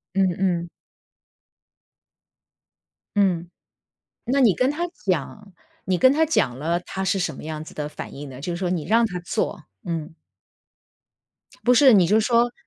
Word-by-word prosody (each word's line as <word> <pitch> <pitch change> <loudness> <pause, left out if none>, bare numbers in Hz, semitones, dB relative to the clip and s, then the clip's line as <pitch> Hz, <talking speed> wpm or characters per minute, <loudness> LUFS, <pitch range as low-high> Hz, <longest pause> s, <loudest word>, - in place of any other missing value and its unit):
嗯 195 -1 +3
嗯。 175 -3 0 2.5
嗯。 180 -4 +1 0.8
那 265 +4 +1
你 225 -7 +5
跟 255 +6 +1
她 335 +4 -2 0.2
讲 195 +3 -3 0.3
你 185 -1 +1
跟 260 +7 +6
她 315 +2 +3
讲 130 - +1
了， 165 +4 0
她 190 +2 -5
是 195 - +1
什 180 - -2
么 - - -10
样 155 0 -5
子 - - -12
的 150 -1 -4
反 - - -8
应 145 0 -8
呢？ 130 -1 -10
就 175 +4 -3
是 - - -4
说 180 0 -2
你 175 -4 -2
让 230 +2 +3
她 180 -5 -4
做， 175 -1 -3 0.2
嗯。 165 -2 -4 1.5
不 250 - +5
是， 260 0 +7
你 190 -4 +6
就 210 +6 +3
说 235 +2 +2
185 Hz, 170 characters per minute, -23 LUFS, 170-230 Hz, 2.5 s, 是